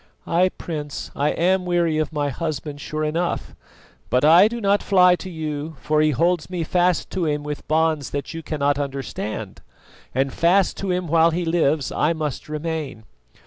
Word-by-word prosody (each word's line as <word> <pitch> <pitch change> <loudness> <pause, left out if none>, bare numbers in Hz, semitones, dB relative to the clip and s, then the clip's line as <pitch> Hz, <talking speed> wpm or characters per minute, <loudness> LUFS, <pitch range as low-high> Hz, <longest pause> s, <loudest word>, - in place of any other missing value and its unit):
"Ay, 180 +2 +3
Prince, 150 -4 -5
I 145 +2 +1
am 185 +2 +1
weary 170 -3 +1
of 155 -1 -1
my 145 -2 -1
husband 150 0 -4
sure 155 +2 -3
enough; 165 +3 -2 0.6
but 125 +3 +2
I 170 +6 +8
do 235 +2 -4
not 200 -1 +2
fly 180 -2 +5
to 185 - -8
you, 155 -2 -5
for 155 0 +1
he 155 - +4
holds 170 +4 +1
me 180 -2 -2
fast 180 +2 +1
to 180 -4 -1
him 150 -1 -1
with 150 0 -6
bonds 155 -2 +1
that 140 +4 -4
you 165 - -5
cannot 145 -2 0
understand, 130 -7 -5 0.5
and 135 0 0
fast 180 +3 +3
to 195 - -3
him 180 -1 -1
while 165 +1 +4
he 170 +1 -2
lives 160 -3 +1
I 155 +3 +1
must 155 -3 -4
remain." 150 -6 -4
160 Hz, 180 wpm, -22 LUFS, 145-175 Hz, 0.6 s, I